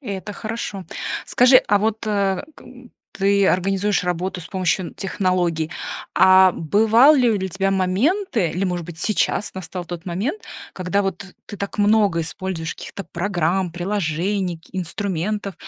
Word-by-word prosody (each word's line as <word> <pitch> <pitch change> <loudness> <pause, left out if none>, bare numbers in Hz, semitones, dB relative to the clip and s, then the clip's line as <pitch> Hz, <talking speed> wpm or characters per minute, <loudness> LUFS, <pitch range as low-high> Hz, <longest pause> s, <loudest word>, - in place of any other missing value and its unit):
Это 205 -5 -6
хорошо. 215 -3 -5 0.4
Скажи, 250 +1 +6
а 205 - +4
вот 220 +1 0
к 200 -2 0 0.7
ты 200 0 +3
организуешь 195 +3 +1
работу 180 +1 -2
с 165 - -6
помощью 185 -1 -1
технологий, 180 -5 -1 0.5
а 190 0 +7
бывали 225 - +4
ли 190 - -2
у - - -5
тебя 195 +1 -1
моменты, 195 - +1
или, 185 +3 -2
может 180 -3 -2
быть, 160 -1 -10
сейчас 210 0 0
настал 180 -1 -6
тот 175 -1 -7
момент, 215 - -3 0.3
когда 185 +2 -1
вот 195 0 -3 0.2
ты 205 - -8
так 200 +1 -6
много 205 -5 +3
используешь 165 0 -4
каких-то 200 - -8
программ, 180 0 -1
приложений, 180 0 -2
к 165 - -26
инструментов, 195 +2 -3
190 Hz, 140 wpm, -21 LUFS, 180-205 Hz, 0.7 s, а